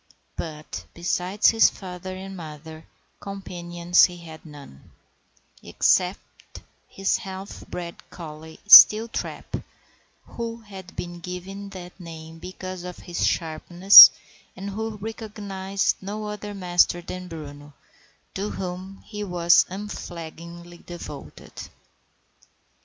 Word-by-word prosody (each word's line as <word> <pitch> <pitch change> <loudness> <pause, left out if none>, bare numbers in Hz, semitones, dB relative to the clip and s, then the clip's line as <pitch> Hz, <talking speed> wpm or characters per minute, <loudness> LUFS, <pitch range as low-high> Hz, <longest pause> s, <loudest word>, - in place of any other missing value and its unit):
But, 155 -2 -7
besides 180 +4 +1
his 225 0 +5
father 185 -1 -8
and 190 +1 -8
mother, 160 -1 -10 0.3
companions 175 -3 +1
he 180 -1 -7
had 160 -2 -12
none, 140 - -14 0.7
except - - -1 0.3
his 195 0 -1
half 190 0 -9
bred 170 -1 -7
collie, 160 -1 -11
Steeltrap, 220 +2 +6 0.6
who 230 0 -7
had 190 -4 -12
been 175 0 -7
given 185 +3 -8
that 180 -1 -11
name 165 -1 -11
because 185 +1 -8
of 180 -1 -8
his 175 - -2
sharpness, 175 +4 +8 0.5
and 195 +2 -6
who 220 +1 -5
recognized 205 -3 -3
no 210 +2 -6
other 210 0 -6
master 175 -2 +2
than 185 0 -7
Bruno, 145 -3 -10 0.6
to 200 +2 -3
whom 185 +1 -7
he 210 -1 -6
was 175 -3 +3
unflaggingly 170 -3 -9
devoted. 150 - -10
180 Hz, 105 wpm, -24 LUFS, 170-195 Hz, 0.7 s, sharpness